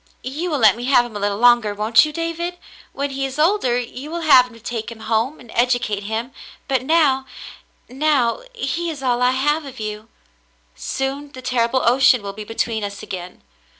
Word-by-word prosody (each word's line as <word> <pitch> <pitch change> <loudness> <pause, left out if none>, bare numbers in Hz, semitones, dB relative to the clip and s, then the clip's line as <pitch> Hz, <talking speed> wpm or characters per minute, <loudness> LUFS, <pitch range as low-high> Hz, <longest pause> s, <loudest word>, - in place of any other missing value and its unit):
You 300 +8 -3
will 300 - 0
let 215 -6 +5
me 240 +1 -6
have 255 -2 +4
him 235 -3 -10
a - - -3
little 200 0 -1
longer, 235 -3 +4
won't 215 +6 +4
you, 305 - -4
David? 335 +2 -3 0.3
When 280 0 -3
he 270 0 -3
is 270 0 -4
older, 305 -7 +2
you 250 +4 -6
will 340 +1 -4
have 255 -6 +6
to 230 - -15
take 230 0 -5
him 225 -1 -11
home 225 +6 -1
and 235 -3 -14
educate 240 -4 0
him, 225 +4 -3 0.4
but 265 -3 +1
now 270 -2 +2 0.3
— - - -29 0.2
now 265 - +1
— - - -32
he 340 - -2
is 290 -4 -6
all 245 -1 +1
I 250 - +4
have 295 +5 +1
of 275 -5 -10
you. 215 +1 -6 0.6
Soon 275 +2 -4
the 255 - -9
terrible 250 +1 +1
ocean 250 -2 +4
will 200 0 -5
be 215 +1 -7
between 225 0 -2
us 200 -1 -6
again. 180 -1 -8
250 Hz, 205 wpm, -20 LUFS, 225-285 Hz, 0.6 s, have